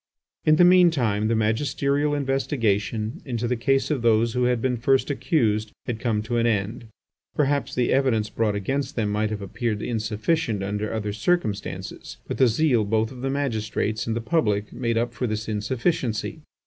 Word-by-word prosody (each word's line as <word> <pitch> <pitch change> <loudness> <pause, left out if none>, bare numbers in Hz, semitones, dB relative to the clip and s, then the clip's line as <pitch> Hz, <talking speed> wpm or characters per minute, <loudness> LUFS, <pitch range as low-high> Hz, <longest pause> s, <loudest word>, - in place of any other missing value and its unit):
In 155 - +6
the 175 - +5
mean 180 -1 +7
time 110 -9 0
the 115 - +1
magisterial 140 +6 +1
investigation 115 -5 -1
into 120 -3 -2
the 125 - 0
case 135 +3 +1
of 140 -5 0
those 115 0 +3
who 125 0 +1
had 125 -1 +2
been 125 +1 0
first 135 +4 +2
accused 110 - 0
had 115 -3 -3
come 110 -3 0
to 120 +2 -2
an 115 0 +2
end. 110 +1 -1 0.5
Perhaps 145 -1 0
the 125 -1 +1
evidence 125 -6 +2
brought 105 0 -1
against 135 +8 -2
them 105 -3 0
might 105 +1 0
have 105 -2 -4
appeared 105 +2 -3
insufficient 110 +1 -1
under 105 +2 -2
other 105 -2 -3
circumstances, 110 - -2
but - - -4
the 130 - +6
zeal 120 -1 +2
both 110 +2 0
of 125 -2 -10
the 135 - -1
magistrates 110 -5 -2
and 115 - -1
the 115 - -2
public 105 -7 0
made 115 -2 -1
up 120 +1 0
for 120 +1 -2
this 110 0 -3
insufficiency. 115 +5 -1
115 Hz, 180 wpm, -24 LUFS, 110-135 Hz, 0.5 s, mean